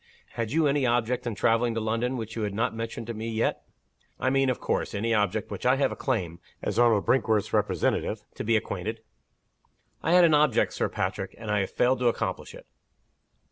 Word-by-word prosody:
Had 115 -2 -3
you 160 +2 +2
any 140 -1 +2
object 120 0 0
in 115 - -2
traveling 115 +2 +2
to - - 0
London, 115 +4 -1
which 115 -1 -6
you 115 - -3
have 105 -2 -2
not 115 +3 0
mentioned 115 0 -5
to 115 - -5
me 110 +1 -5
yet? 110 0 -1 0.6
I 130 - +1
mean, 135 0 +2
of 125 - -1
course, - - -2
any 115 +3 0
object 105 0 0
with - - -4
which - - -9
I 130 - +5
have 135 -1 +1
a - - -4
claim 90 - -2 0.2
(as - - -2
Arnold 115 -4 +4
Brinkworth's 110 -6 +1
representative) - - 0
to - - -5
be 115 0 +3
acquainted?" 110 +2 -4 1.0
"I 165 - +1
had 180 0 +7
an 165 -2 +5
object, 150 -4 +3
Sir - - -1
Patrick. - - -3
And 110 -1 -5
I 105 - +2
have 95 - -1
failed 125 +1 +2
to 125 - +2
accomplish 120 - -2
it." - - -13
115 Hz, 215 wpm, -27 LUFS, 110-130 Hz, 1.0 s, had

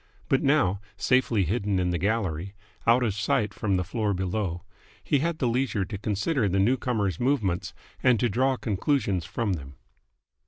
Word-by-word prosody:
But 135 - +3
now, 135 -10 +2 0.2
safely 125 -5 +2
hidden 100 +2 0
in 90 -1 +1
the 85 - -1
gallery, 100 -3 -1 0.3
out 120 +2 +5
of 110 -4 +1
sight 105 0 0
from 100 -3 0
the 90 - 0
floor 105 +1 -1
below, 90 -1 -2 0.4
he 140 +10 +2
had 165 +2 -1
the 130 - 0
leisure 120 -4 0
to 100 +2 -5
consider 105 - 0
the 95 - 0
newcomer's 105 -4 +1
movements 115 -10 0 0.3
and 125 -4 +4
to 120 - +2
draw 130 +4 +1
conclusions 100 - 0
from 115 -5 -1
them. 70 -4 -7
105 Hz, 165 wpm, -26 LUFS, 95-125 Hz, 0.4 s, out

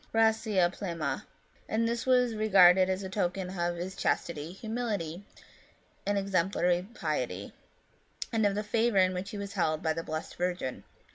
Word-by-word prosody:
gracid 220 -5 +3
plena! 170 -6 -3 0.2
" - - -33
and 230 +1 +1
this 235 +2 -2
was 250 -2 +4
regarded 190 -4 +6
as 190 +1 -1
a - - -3
token 185 -1 -2
of 175 -1 -1
his 180 +3 -5
chastity, 160 -1 -1
humility, 205 -5 -3 0.8
and 205 0 +2
exemplary 185 -2 +1
piety, 125 - -3 0.8
and 225 -1 +2
of 200 -1 +2
the 210 - -1
favour 225 0 +1
in 185 -1 +4
which 185 +2 -4
he 210 - -6
was 200 0 -5
held 155 -5 0
by 160 -1 +2
the 165 - -3
Blessed 155 -1 -5
Virgin. 175 -7 -2
190 Hz, 160 wpm, -30 LUFS, 175-210 Hz, 0.8 s, regarded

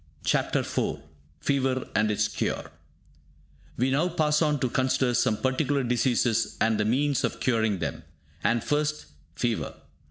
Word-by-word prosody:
CHAPTER - - +1
IV - - -2 0.4
FEVER 135 -2 0
AND 105 +1 +2
ITS 105 0 +1
CURE - - -3 1.1
We 130 +3 +1
now 155 +7 +2
pass 155 -3 +1
on 150 -2 +2
to 130 - +2
consider 130 0 +1
some 110 -3 +2
particular 135 +2 0
diseases 120 -2 +1
and 110 -1 +2
the 105 - +2
means 135 +4 +1
of - - -1
curing 110 -5 +1
them. - - -4 0.4
And 120 0 +2
first, 150 0 -1 0.3
fever. 120 +1 -2
130 Hz, 145 wpm, -27 LUFS, 115-145 Hz, 1.1 s, AND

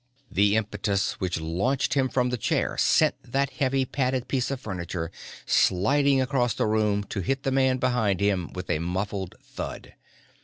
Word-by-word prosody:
The 100 +2 +3
impetus 105 -2 -1
which 90 -2 -1
launched 95 +12 0
him 130 -2 +2
from 125 -1 +1
the 125 - -1
chair 105 - 0
sent - - +4
that 140 +3 -1
heavy 135 0 0
padded 130 -1 -1
piece 130 -3 0
of 135 -2 -3
furniture 90 -6 -4 0.3
sliding 135 +9 +3
across 130 -2 +1
the - - 0
floor 105 -1 +1
to - - -4
hit 135 +9 -1
the 135 - 0
man 130 -1 +3
behind 120 -7 +1
him 100 -4 0
with 90 0 -6
a 75 - +1
muffled 95 +2 -3
thud. - - -7
110 Hz, 165 wpm, -26 LUFS, 95-130 Hz, 0.3 s, sent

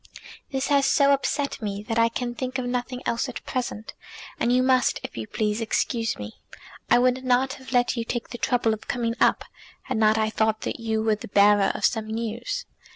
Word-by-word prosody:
"This 270 0 -1
has 280 -1 +4
so 280 -1 +4
upset 280 0 -1
me 205 -1 -4
that 230 -1 0
I 230 0 +4
can 240 +1 -3
think 255 +2 -4
of 255 - -3
nothing 250 +1 -3
else 235 +3 -1
at 255 - -8
present, 240 -4 -4 0.5
and 240 - +2
you 250 +1 +4
must, 255 -1 +3
if - - -7
you 110 -1 -5
please, 210 +1 -1
excuse 225 0 -1
me. 105 +1 -8 0.5
I - - +6
would 255 +1 +2
not 255 +1 +2
have 260 - -11
let 245 -1 +2
you 230 - -2
take 235 0 -4
the 240 - -7
trouble 240 -3 +1
of 215 - -8
coming 235 -2 -1
up, - - +3 0.4
had 260 -3 -3
not 215 0 +4
I 220 0 +1
thought 220 0 +1
that - - -4
you 220 -1 -1
were 220 -1 +3
the - - -9
bearer 200 0 +4
of - - 0
some 220 -2 0
news." 235 - -3
240 Hz, 215 wpm, -25 LUFS, 220-255 Hz, 0.5 s, I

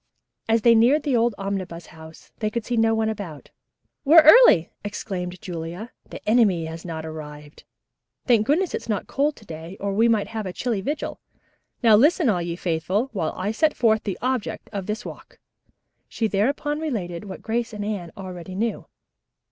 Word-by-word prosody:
As 225 -1 +3
they 235 - +7
neared 250 +7 +4
the 280 -4 +1
old 235 -2 +2
Omnibus 185 -4 -4
House 160 0 -14
they 215 - 0
could 230 0 -4
see 245 - -2
no 225 0 +3
one 220 0 0
about. 195 -9 -6 0.5
"We're 315 +3 +8
early!" 310 - +7
exclaimed 185 -3 -5
Julia. 175 +6 -6 0.2
"The - - -10
enemy 210 -7 +3
has 160 +1 -7
not 160 -2 -6
arrived. 150 -2 -10 0.6
Thank 230 -4 +3
goodness, 345 +5 +1
it's - - -5
not 210 -3 -1
cold 290 +2 0
to 215 - -17
day 165 +2 -9
or 200 0 -2
we 225 +4 +3
might 220 -3 +1
have 220 -3 -4
a 180 - -5
chilly 230 -3 -2
vigil. 295 +7 -4 0.6
Now 225 -2 +7
listen, 295 - +4
all 180 -5 +1
ye 170 0 -3
faithful, 180 +8 -1
while 175 -6 -2
I 190 +3 -1
set 305 +7 +1
forth 220 -3 +3
the 195 -3 -3
object 255 -4 -2
of 195 -2 -4
this 215 +3 -4
walk." - - -10 0.7
She 225 - -1
thereupon 280 +9 0
related 210 - -4
what 190 - -9
Grace 235 +1 -2
and 210 -1 -5
Anne 200 -5 -4
already 185 -1 -8
knew. 225 +3 -2
210 Hz, 180 wpm, -23 LUFS, 180-235 Hz, 0.7 s, We're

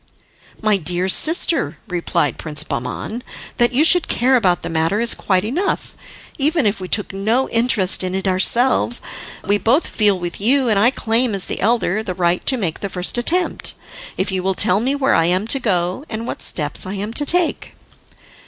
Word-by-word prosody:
"My 215 -2 +3
dear 180 +1 -2
sister," 320 - 0
replied 175 -5 -1
Prince 155 -2 0
Bahman, 155 - -5 0.4
"that 240 -1 +3
you 265 +5 +2
should 345 +1 +4
care 260 +3 +2
about 185 -8 +1
the - - -4
matter 165 +5 0
is 235 0 +3
quite 185 -2 0
enough, 325 - -2 0.5
even 300 0 +1
if 200 -1 0
we 185 - -6
took 205 +1 -1
no 220 +7 0
interest 230 -6 +2
in 185 0 -3
it 190 +1 -2
ourselves. 235 +6 +2 0.4
But - - -13
we 205 - +4
both 255 +11 +2
feel 205 -3 +2
with 175 +1 -5
you, 255 +3 +3
and 210 -3 +2
I 225 +4 +5
claim, 230 -2 0
as 195 - +5
the - - -4
elder, 215 -1 +1
the 190 -5 -5
right 175 -1 0
to 265 - +3
make 180 -8 -3
the 200 - -4
first 180 0 -4
attempt, 350 +9 0 0.4
if - - -1
you 190 -1 -1
will 190 +1 -1
tell 180 +2 +2
me 260 +5 0
where 275 -1 +1
I 165 - +3
am 185 +4 +1
to 275 - +3
go, 185 0 -1
and 225 +1 -5
what - - -6
steps 150 +3 -2
I 190 - -5
am 205 +3 -5
to 290 - +3
take." 355 +2 -1
210 Hz, 200 wpm, -18 LUFS, 185-245 Hz, 0.5 s, I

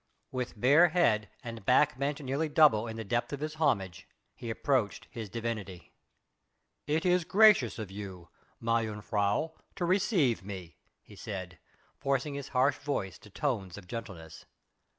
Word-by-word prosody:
With 125 -3 -4
bare 145 +9 +6
head 110 - +2
and 115 -3 -7
back 130 +3 +3
bent 140 +2 -1
nearly 140 +4 -1
double 145 -8 +5
in 110 0 -6
the 110 - -4
depth 120 +3 -1
of 140 - -3
his 155 +1 -3
homage 95 - 0 0.3
he 115 - -8
approached 115 -2 0
his 110 -3 -6
divinity. 105 -5 -5 1.0
"It 155 +3 0
is 180 -1 +3
gracious 200 - +5
of 110 -4 -6
you, 95 -4 -8 0.3
mejuffrouw, 110 +3 0 0.2
to 175 - -1
receive 175 - +2
me," 95 -4 -8 0.3
he - - -15
said 95 -5 -7 0.4
forcing 140 +1 0
his 140 -1 -5
harsh 135 +1 +2
voice 100 - -3
to 105 - -15
tones 105 - -2
of 100 - -10
gentleness. 90 -8 -8
115 Hz, 150 wpm, -30 LUFS, 100-145 Hz, 1.0 s, bare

